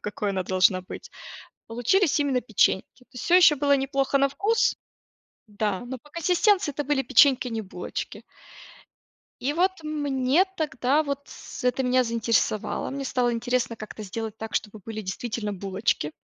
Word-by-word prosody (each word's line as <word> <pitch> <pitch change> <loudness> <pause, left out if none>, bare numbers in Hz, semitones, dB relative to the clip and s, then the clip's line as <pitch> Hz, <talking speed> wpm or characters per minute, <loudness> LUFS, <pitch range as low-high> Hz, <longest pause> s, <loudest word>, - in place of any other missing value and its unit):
какой 205 0 -3
она 190 -1 -1
должна 185 +1 +3
быть, 185 - -10 0.6
получились 270 - +2
именно 275 -3 +1
печеньки. 225 +1 0
То - - -53
есть 250 - -7
всё 350 - +3
ещё 345 -5 +7
было 285 0 +3
неплохо 275 0 0
на 275 - +4
вкус 425 +9 +1 0.7
Да. 205 -2 -2
Но 260 +1 -6
по 295 - -20
консистенции 360 +2 +2
это 290 - 0
были 275 -2 +1
печеньки, 265 0 +5
а - - -5
не 225 -1 -2
булочки. 185 -3 -6 1.2
И 275 +3 0
вот 365 +3 +2
мне 290 0 +1
тогда 285 -1 +1
вот 280 -2 -3
с - - -10
это 250 +1 +1
меня 255 0 +2
заинтересовало, 230 -2 0
мне 275 0 -4
стало 250 -2 0
интересно 240 0 -1
как-то 215 0 -9
сделать 220 +2 -5
так, 220 0 -7
чтобы 215 0 -2
были 220 -1 -5
действительно 210 +2 -4
булочки. 190 -5 -2
250 Hz, 160 wpm, -25 LUFS, 215-285 Hz, 1.2 s, ещё